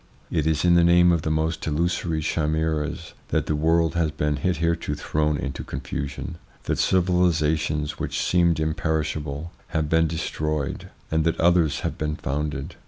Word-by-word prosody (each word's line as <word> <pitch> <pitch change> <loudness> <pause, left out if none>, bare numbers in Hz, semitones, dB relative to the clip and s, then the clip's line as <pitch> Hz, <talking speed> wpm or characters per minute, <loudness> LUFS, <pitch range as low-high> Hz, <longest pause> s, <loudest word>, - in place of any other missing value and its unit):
It 80 -3 +1
is 80 +1 +1
in 85 - +5
the 85 0 +5
name 85 +1 +6
of 85 -2 +2
the 80 - -2
most 80 +1 -1
illusory 85 +1 0
chimeras 80 +1 -1
that - - 0
the 75 - 0
world 80 +2 +2
has 85 -2 +1
been 75 -1 -1
hitherto 85 -1 0
thrown 75 0 0
into 70 -1 -4
confusion, 70 +1 -5 0.2
that - - -1
civilisations 80 -5 +1
which - - -2
seemed 85 -3 +2
imperishable 80 -1 -2 0.2
have 80 -2 -1
been 80 0 +3
destroyed, 75 -2 -3 0.2
and 80 0 +2
that 80 - 0
others 85 -3 +3
have - - -3
been 75 0 -1
founded. 70 -1 -3
80 Hz, 155 wpm, -24 LUFS, 75-85 Hz, 0.2 s, name